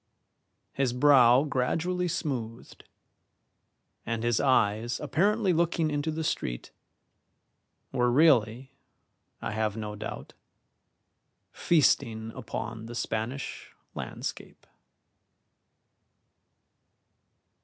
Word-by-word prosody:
His 135 Hz, -3 st, 0 dB
brow 130 Hz, -1 st, +6 dB
gradually 165 Hz, +6 st, -1 dB
smoothed, 125 Hz, -9 st, -5 dB, 1.2 s
and 115 Hz, -1 st, -3 dB
his 120 Hz, -1 st, +1 dB
eyes 115 Hz, -2 st, +1 dB
apparently 200 Hz, +2 st, +1 dB
looking 165 Hz, -1 st, +1 dB
into 145 Hz, +2 st, -1 dB
the 160 Hz, +1 st, -3 dB
street -, -, -3 dB, 1.2 s
were 125 Hz, -2 st, +1 dB
really, 130 Hz, -3 st, +3 dB, 0.7 s
I -, -, -2 dB
have 110 Hz, 0 st, -1 dB
no 105 Hz, -1 st, -5 dB
doubt, -, -, -7 dB, 1.2 s
feasting 115 Hz, -8 st, +1 dB
upon 115 Hz, 0 st, -6 dB
the 120 Hz, -, -8 dB
Spanish 120 Hz, +4 st, -4 dB, 0.2 s
landscape. -, -, -7 dB
125 Hz, 80 wpm, -28 LUFS, 115-155 Hz, 1.2 s, brow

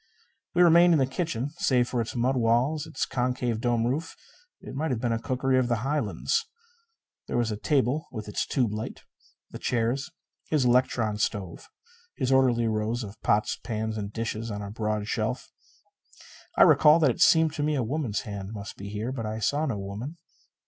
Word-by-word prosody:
We 180 Hz, -, +6 dB
remained 170 Hz, 0 st, +6 dB
in -, -, +3 dB
his 130 Hz, -1 st, +1 dB
kitchen. 140 Hz, -3 st, -2 dB
Save 125 Hz, -2 st, +2 dB
for 120 Hz, -1 st, -1 dB
its 115 Hz, -, -5 dB
mud 125 Hz, +3 st, +1 dB
walls, 125 Hz, +6 st, +1 dB
its 155 Hz, -4 st, -2 dB
concave, 125 Hz, -2 st, -1 dB
dome 120 Hz, -1 st, +1 dB
roof, 140 Hz, +7 st, -2 dB, 0.4 s
it -, -, -10 dB
might 155 Hz, +4 st, -2 dB
have 125 Hz, -4 st, -1 dB
been 120 Hz, 0 st, -1 dB
a 115 Hz, -, 0 dB
cookery 130 Hz, +1 st, +1 dB
of 125 Hz, -, +1 dB
the 120 Hz, -2 st, -1 dB
Highlands. 150 Hz, -, 0 dB, 0.8 s
There -, -, -2 dB
was 120 Hz, -2 st, +1 dB
a -, -, -2 dB
table 140 Hz, +6 st, 0 dB
with 110 Hz, -4 st, -6 dB
its 105 Hz, -, -2 dB
tube 120 Hz, -6 st, 0 dB
light; 110 Hz, +1 st, -5 dB, 0.5 s
the -, -, -8 dB
chairs; 120 Hz, +6 st, -1 dB, 0.4 s
his 150 Hz, -5 st, +2 dB
electron 120 Hz, -4 st, +2 dB
stove; 95 Hz, -5 st, -3 dB, 0.5 s
his 130 Hz, -, -1 dB
orderly 125 Hz, -3 st, +3 dB
rows 110 Hz, +2 st, -1 dB
of 105 Hz, 0 st, -10 dB
pots 105 Hz, +1 st, +1 dB
and -, -, -34 dB
pans 110 Hz, -1 st, -3 dB
and 100 Hz, -1 st, -4 dB
dishes 115 Hz, 0 st, -4 dB
on 105 Hz, -1 st, -4 dB
a 100 Hz, -, -6 dB
broad 105 Hz, -1 st, -2 dB
shelf. -, -, -2 dB, 1.1 s
I -, -, +8 dB
recall 150 Hz, +2 st, +7 dB
that 150 Hz, -6 st, +4 dB
it -, -, -6 dB
seemed 160 Hz, -2 st, +5 dB
to 150 Hz, -, -3 dB
me 150 Hz, 0 st, +1 dB
a 130 Hz, -, 0 dB
woman's 125 Hz, -3 st, -2 dB
hand 100 Hz, -1 st, -6 dB
must 100 Hz, -2 st, -7 dB
be 100 Hz, +1 st, -7 dB
here. 105 Hz, +4 st, -3 dB
But 115 Hz, -5 st, -4 dB
I 110 Hz, +1 st, -3 dB
saw 145 Hz, +8 st, 0 dB
no 115 Hz, -7 st, -2 dB
woman. 105 Hz, +11 st, -6 dB
120 Hz, 195 wpm, -27 LUFS, 110-135 Hz, 1.1 s, I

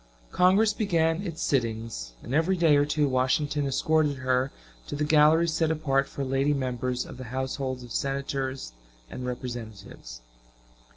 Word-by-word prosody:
Congress 200 Hz, +4 st, +4 dB
began 170 Hz, -5 st, +1 dB
its 170 Hz, -4 st, -5 dB
sittings, 115 Hz, -, -2 dB
and 120 Hz, -, -6 dB
every 165 Hz, +5 st, +2 dB
day 165 Hz, -4 st, +5 dB
or 145 Hz, 0 st, +4 dB
two 150 Hz, -1 st, +1 dB
Washington 140 Hz, +3 st, +1 dB
escorted 150 Hz, +2 st, +1 dB
her 130 Hz, +1 st, 0 dB, 0.4 s
to -, -, -4 dB
the 150 Hz, -, -1 dB
galleries 155 Hz, +2 st, +4 dB
set 160 Hz, 0 st, +1 dB
apart 140 Hz, -4 st, +1 dB
for 140 Hz, -, -5 dB
lady 135 Hz, +2 st, +1 dB
members 125 Hz, -1 st, -2 dB
of -, -, -10 dB
the 130 Hz, -, -7 dB
households 130 Hz, +1 st, -3 dB
of 120 Hz, -, -11 dB
Senators 135 Hz, -, -3 dB, 0.4 s
and 125 Hz, -, -5 dB
Representatives. 110 Hz, -, -7 dB
135 Hz, 150 wpm, -27 LUFS, 125-155 Hz, 0.4 s, day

